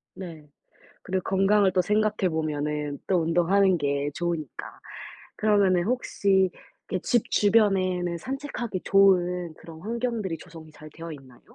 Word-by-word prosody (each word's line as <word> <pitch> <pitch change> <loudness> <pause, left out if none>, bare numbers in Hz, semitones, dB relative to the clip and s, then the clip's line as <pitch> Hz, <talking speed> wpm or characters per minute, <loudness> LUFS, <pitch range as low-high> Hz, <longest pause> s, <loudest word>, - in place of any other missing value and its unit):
네. 165 -5 -9 0.5
그리고 185 0 -2
건강을 195 0 +3
또 185 - +3
생각해 210 0 +1
보면은 150 -2 -2
또 180 -3 +2
운동하는 175 +3 +3
게 140 0 -1
좋으니까. 170 -5 -4 0.6
그러면은 200 -4 +3
혹시 200 -5 +1 0.4
이렇게 185 - -2
집 240 -3 +1
주변에는 185 -5 +2
산책하기 255 - -5
좋은 180 -3 +3
그런 160 0 -12
환경들이 225 -3 -3
조성이 165 -2 -13
잘 155 0 -13
되어있나요? 145 -7 -10
180 Hz, 305 characters per minute, -26 LUFS, 160-200 Hz, 0.6 s, 건강을